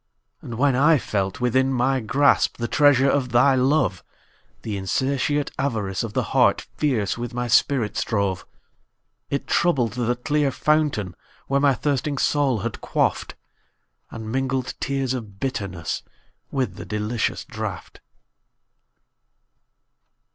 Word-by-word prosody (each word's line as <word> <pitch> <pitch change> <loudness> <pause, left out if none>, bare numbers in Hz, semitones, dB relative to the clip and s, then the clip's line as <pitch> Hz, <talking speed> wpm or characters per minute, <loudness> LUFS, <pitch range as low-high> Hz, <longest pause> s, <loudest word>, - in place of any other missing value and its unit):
And 115 - -7
when 135 +2 +2
I 150 +4 +5
felt 95 -6 -2
within 130 +2 +2
my 130 +1 +1
grasp, 135 +5 +2
The 120 - -2
treasure 140 -1 +4
of 135 -2 +1
thy 120 +4 +4
love; 130 - +1 0.6
The 105 - -3
insatiate 140 - -1
avarice 110 -9 -1
of - - -5
the - - +1
heart - - +4
Fierce 120 -8 0
with 120 0 -5
my 125 0 -2
spirit 120 -2 +2
strove.It 100 +6 -5
troubled 130 - +1
the 120 0 0
clear 145 +3 0
fountain 140 - 0 0.3
where 140 +1 +1
My 140 -2 +4
thirsting 140 +2 -1
soul 135 -6 +1
had - - -4
quaffed, - - -1 0.7
And 110 -1 -7
mingled 130 0 -1
tears 135 -1 -1
of 105 -6 -7
bitterness 100 - -3 0.5
With 135 -3 -2
the - - -7
delicious 105 +2 -2
draught. - - -6
130 Hz, 125 wpm, -23 LUFS, 110-140 Hz, 0.7 s, I